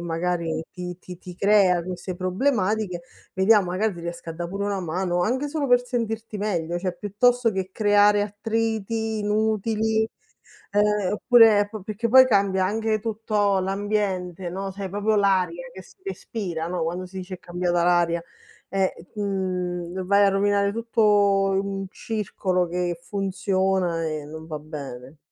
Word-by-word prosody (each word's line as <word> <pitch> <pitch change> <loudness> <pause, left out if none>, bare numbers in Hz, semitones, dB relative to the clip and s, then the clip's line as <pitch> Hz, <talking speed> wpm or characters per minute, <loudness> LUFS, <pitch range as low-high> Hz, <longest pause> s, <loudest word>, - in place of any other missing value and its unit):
magari 170 -1 -2
ti 180 -1 -6
ti 180 -1 -10
ti 180 0 -10
crea 190 -2 +4
queste 180 +1 -5
problematiche, 190 -1 0 0.3
vediamo 195 +1 +4
magari 200 +2 0
ti 170 - -9
riesco 170 0 -7
a - - -4
da' 170 +1 -5
pure 200 +2 -3
una 200 -2 -1
mano, 175 +1 -1
anche 260 +9 0
solo 290 -1 -2
per 245 0 +4
sentirti 225 -3 -3
meglio, 175 -4 -1
cioè 180 -1 -3
piuttosto 235 +4 +2
che 190 -2 -3
creare 205 0 +4
attriti 220 +1 -2
inutili, 220 +1 +1 0.7
ehm, 205 -1 +2
oppure 225 -2 +6
po 215 -2 -6
perché 215 +4 -3
poi 260 +2 +9
cambia 195 -4 +2
anche 220 +2 0
tutto 210 -2 0
l'ambiente, 190 -2 -2
no, 195 +2 -4
sai 195 0 -6
proprio 205 +3 0
l'aria 200 - +1
che - - -10
si - - -19
respira, 190 - -4
no, 175 -1 -2
quando 175 +3 -3
si 185 +1 -10
dice: 185 0 -6
"È - - -18
cambiata 175 0 -1
l'aria." 170 -1 +2 0.5
Eh, 195 -1 +1 0.2
mhmm, 185 -3 -2
vai 200 +2 +5
a - - +5
rovinare 200 +1 +2
tutto 230 +1 -1 0.5
un 195 0 -2
circolo 190 -4 -2
che 175 0 -2
funziona 190 -2 0
e 155 -2 -3
non 160 +1 -9
va 155 -2 -5
bene. 140 -3 -8
195 Hz, 150 wpm, -24 LUFS, 180-215 Hz, 0.7 s, poi